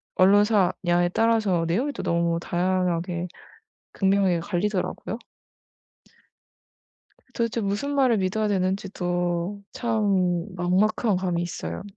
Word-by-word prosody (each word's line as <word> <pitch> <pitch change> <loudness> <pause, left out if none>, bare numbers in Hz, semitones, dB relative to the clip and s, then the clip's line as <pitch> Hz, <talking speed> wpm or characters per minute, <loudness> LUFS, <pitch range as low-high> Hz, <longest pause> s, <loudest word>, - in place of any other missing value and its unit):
언론사냐에 185 -3 +3
따라서 220 -7 +2
내용이 235 - 0
또 - - -5
너무 170 0 0
다양하게 180 -1 -1 0.7
극명하게 190 -3 +2
갈리더라고요. 195 +3 -2 2.2
도대체 230 0 -1
무슨 210 +8 -2
말을 260 -4 +3
믿어야 200 +3 0
되는지도 185 -1 -1
참 195 -7 0
막막한 190 +4 +1
감이 180 -2 -1
있어요. 85 - -5
185 Hz, 255 characters per minute, -25 LUFS, 175-210 Hz, 2.2 s, 언론사냐에